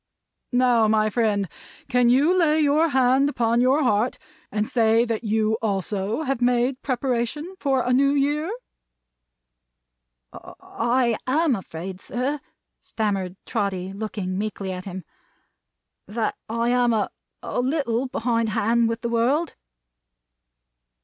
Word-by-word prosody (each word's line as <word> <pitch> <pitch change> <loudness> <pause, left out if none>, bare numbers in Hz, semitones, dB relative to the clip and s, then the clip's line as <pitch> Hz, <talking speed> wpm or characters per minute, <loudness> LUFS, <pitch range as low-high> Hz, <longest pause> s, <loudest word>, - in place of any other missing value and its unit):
Now, 245 -3 +3
my 215 0 +2
friend, 205 -4 +1 0.4
can 250 -2 +3
you 285 +9 +4
lay 315 -4 +3
your 305 +2 +3
hand 265 +1 +3
upon 235 -3 +1
your 265 +4 +3
heart, 230 0 +1 0.3
and 210 +1 -1
say 230 0 +3
that 230 -1 -3
you 220 0 +1
also 205 - -2
have 270 -4 -2
made 245 +1 +1
preparation 260 +5 -2
for 270 -3 +1
a 250 - +1
New 275 +2 +4
Year?" 290 +4 0 1.8
"I 235 -1 -1
am 295 +1 +2
afraid, 185 0 -7
sir," 270 +5 -2 0.4
stammered 195 -4 -2
Trotty, 195 -4 -2
looking 195 -3 -4
meekly 205 -2 -3
at 180 0 -6
him, 190 -1 -6 1.0
"that 220 +1 -2
I 230 +1 0
am 245 -1 +3
a 215 -2 0 0.3
a - - -3
little 260 -2 0
behind 230 -2 0
hand 225 +2 +2
with 230 +1 -3
the 235 - -2
world." 255 +8 +1
235 Hz, 125 wpm, -23 LUFS, 215-260 Hz, 1.8 s, you